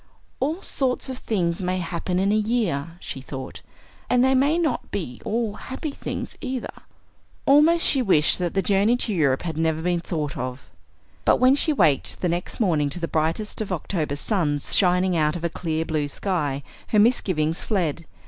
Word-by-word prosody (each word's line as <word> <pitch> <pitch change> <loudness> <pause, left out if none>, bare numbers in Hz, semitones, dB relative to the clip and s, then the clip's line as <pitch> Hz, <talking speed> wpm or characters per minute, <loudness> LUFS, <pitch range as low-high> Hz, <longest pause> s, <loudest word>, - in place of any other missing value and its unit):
"All 315 +8 -1
sorts 265 0 0
of 260 -1 -5
things 175 -5 -1
may 185 0 -1
happen 180 +1 -2
in 195 +2 +2
a - - +3
year," 205 -8 -1
she 135 - -7
thought, 130 0 -7 0.5
"and 250 0 +4
they 265 - +3
may 280 +5 +3
not 315 -7 -1
be 125 -11 -5
all 225 -1 -1
happy 265 +7 -6
things, - - -5
either." 260 -3 -4 0.7
Almost 310 +5 +5
she 270 - +4
wished 185 -10 +4
that 175 0 -2
the 195 - +2
journey 205 +4 +3
to 230 -3 0
Europe 140 -7 +1
had 165 -3 -4
never 160 -1 +1
been 175 0 +1
thought 155 -4 -3
of! 125 +1 -6 0.5
But - - +4
when 255 +2 +6
she 300 +3 +3
waked 165 - +2
the 180 - +1
next 175 +1 -3
morning 160 -9 +2
to 150 - -4
the 165 - -2
brightest 165 +9 -1
of 210 - -4
October 160 -4 -2
suns 150 -4 0
shining 180 -1 +3
out 155 -1 +1
of 175 - -6
a 170 - +1
clear 160 -1 -2
blue 155 -2 -1
sky, 145 -4 -2 0.2
her 215 - +1
misgivings 185 -8 +2
fled. 170 -6 -1
180 Hz, 185 wpm, -24 LUFS, 155-230 Hz, 0.7 s, when